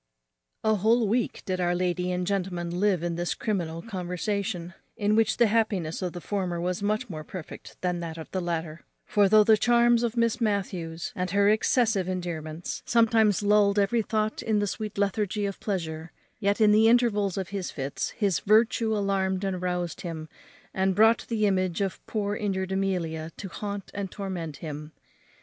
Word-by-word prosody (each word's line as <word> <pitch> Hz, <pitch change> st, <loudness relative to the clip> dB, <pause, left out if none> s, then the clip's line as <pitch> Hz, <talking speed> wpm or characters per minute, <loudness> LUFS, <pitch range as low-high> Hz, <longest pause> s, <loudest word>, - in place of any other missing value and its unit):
_ -, -, +2 dB
A 215 Hz, -, +3 dB
whole 225 Hz, +3 st, +3 dB
week 235 Hz, +3 st, -1 dB
did 185 Hz, -2 st, -1 dB
our 175 Hz, 0 st, +1 dB
lady 180 Hz, 0 st, 0 dB
and 180 Hz, 0 st, -1 dB
gentleman 180 Hz, -3 st, -2 dB
live 195 Hz, -4 st, +2 dB
in 170 Hz, -1 st, -2 dB
this 175 Hz, 0 st, -1 dB
criminal 170 Hz, -6 st, -2 dB
conversation, 180 Hz, -2 st, -3 dB, 0.2 s
in 210 Hz, +1 st, +2 dB
which 225 Hz, 0 st, +2 dB
the 240 Hz, -, +5 dB
happiness 205 Hz, -7 st, 0 dB
of 180 Hz, -2 st, -2 dB
the 175 Hz, -, -6 dB
former 185 Hz, -4 st, -2 dB
was 180 Hz, +2 st, -2 dB
much 215 Hz, +4 st, 0 dB
more 155 Hz, -6 st, -6 dB
perfect 175 Hz, 0 st, -9 dB
than 180 Hz, -1 st, -1 dB
that 165 Hz, -1 st, -5 dB
of 160 Hz, -, -7 dB
the 185 Hz, -, -1 dB
latter; 165 Hz, -2 st, -3 dB, 0.2 s
for, 205 Hz, -2 st, +3 dB
though 215 Hz, +1 st, +7 dB
the 220 Hz, +1 st, +5 dB
charms 240 Hz, 0 st, +4 dB
of 240 Hz, 0 st, -1 dB
Miss 230 Hz, +1 st, +1 dB
Matthews, 185 Hz, -6 st, -2 dB
and 180 Hz, 0 st, -2 dB
her 200 Hz, +2 st, +3 dB
excessive 220 Hz, -3 st, +2 dB
endearments, 170 Hz, -3 st, -4 dB
sometimes 225 Hz, -3 st, +3 dB
lulled 205 Hz, 0 st, +4 dB
every 205 Hz, +4 st, +3 dB
thought 215 Hz, 0 st, -1 dB
in 220 Hz, -1 st, +1 dB
the 205 Hz, -, +1 dB
sweet 210 Hz, +1 st, -5 dB
lethargy 205 Hz, +1 st, 0 dB
of 195 Hz, -1 st, -4 dB
pleasure, 165 Hz, -5 st, -4 dB, 0.3 s
yet 200 Hz, 0 st, +1 dB
in 215 Hz, -1 st, +6 dB
the 215 Hz, +1 st, +5 dB
intervals 210 Hz, -6 st, +2 dB
of 190 Hz, -2 st, -3 dB
his 195 Hz, -3 st, -3 dB
fits 135 Hz, -1 st, -3 dB
his 200 Hz, -6 st, 0 dB
virtue 220 Hz, +1 st, +3 dB
alarmed 195 Hz, -1 st, 0 dB
and 190 Hz, -2 st, -2 dB
roused 180 Hz, -2 st, -2 dB
him, 160 Hz, -3 st, -5 dB, 0.5 s
and 190 Hz, 0 st, +1 dB
brought 225 Hz, +3 st, +4 dB
the 220 Hz, -3 st, +1 dB
image 185 Hz, -3 st, +1 dB
of 195 Hz, -3 st, -2 dB
poor 205 Hz, -2 st, -1 dB
injured 190 Hz, -3 st, -2 dB
Amelia 170 Hz, -5 st, -1 dB
to 195 Hz, -, -6 dB
haunt 200 Hz, +1 st, -6 dB
and 200 Hz, -2 st, -4 dB
torment 180 Hz, -7 st, -5 dB
him. 150 Hz, 0 st, -7 dB
195 Hz, 180 wpm, -27 LUFS, 175-215 Hz, 0.5 s, though